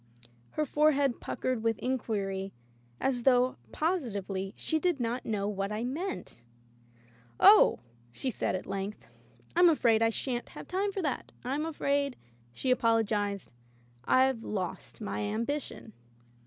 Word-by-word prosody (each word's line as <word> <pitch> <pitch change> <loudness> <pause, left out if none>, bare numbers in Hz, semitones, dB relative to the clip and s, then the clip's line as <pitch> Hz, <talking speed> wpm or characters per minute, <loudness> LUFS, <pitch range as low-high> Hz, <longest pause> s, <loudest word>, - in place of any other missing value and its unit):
Her 305 - 0
forehead 285 -3 +2
puckered 255 -3 -2
with 225 -1 +1
inquiry 200 -6 -2 0.5
as 255 -2 0
though, 250 0 +3
positively, 200 - -2
she 315 - 0
did 350 -3 +1
not 240 +1 -2
know 205 -3 -1
what 200 0 -2
I 215 +2 -2
meant. 295 - -4 1.0
"Oh," 420 +1 +7 0.3
she 255 - -2
said - - -1
at 185 - -4
length, 195 +1 -4 0.5
"Fm 350 0 +7
afraid 235 -8 +3
I 225 - +5
shan't 240 +1 -3
have - - -8
time 390 +2 0
for 390 -2 -3
that. 290 - -2
Vm 285 +5 -1
afraid,*' 280 -3 0 0.4
she 255 - -1
apologized, 215 - +1 0.5
"Fve 260 -1 +4
lost 190 -1 -5
my 210 - -3
ambition.'' 225 +2 -3
240 Hz, 130 wpm, -30 LUFS, 205-285 Hz, 1.0 s, Oh